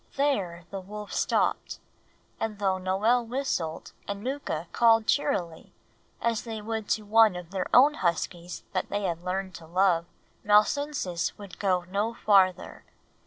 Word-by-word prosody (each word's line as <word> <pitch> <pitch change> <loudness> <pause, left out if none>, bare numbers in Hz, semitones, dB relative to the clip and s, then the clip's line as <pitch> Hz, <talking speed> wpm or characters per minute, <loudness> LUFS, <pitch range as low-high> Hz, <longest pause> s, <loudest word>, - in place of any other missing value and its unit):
There 195 -12 0
the 195 - -4
wolf 210 +2 -8
stopped; - - 0 0.6
and 220 -2 -3
though 190 -2 0
Noel 205 +7 +2
whistled 230 - -3
and 200 0 -5
Mooka 255 - -3
called 225 -1 +4
cheerily, 185 - -1 0.5
as 230 -2 0
they 225 -2 -6
would 220 0 -4
to 215 - 0
one 220 -2 +5
of 180 -1 -8
their 190 -2 -2
own 280 +4 +7
huskies 175 - -2
that 185 - -2
they 205 +1 -2
had 170 -2 -2
learned 185 +1 -3
to 165 - -14
love, 175 -1 +2 0.4
Malsunsis 210 - +1
would 200 -3 -11
go 185 -3 +1
no 205 +6 -2
farther. 190 -5 +2
200 Hz, 145 wpm, -27 LUFS, 180-225 Hz, 0.6 s, own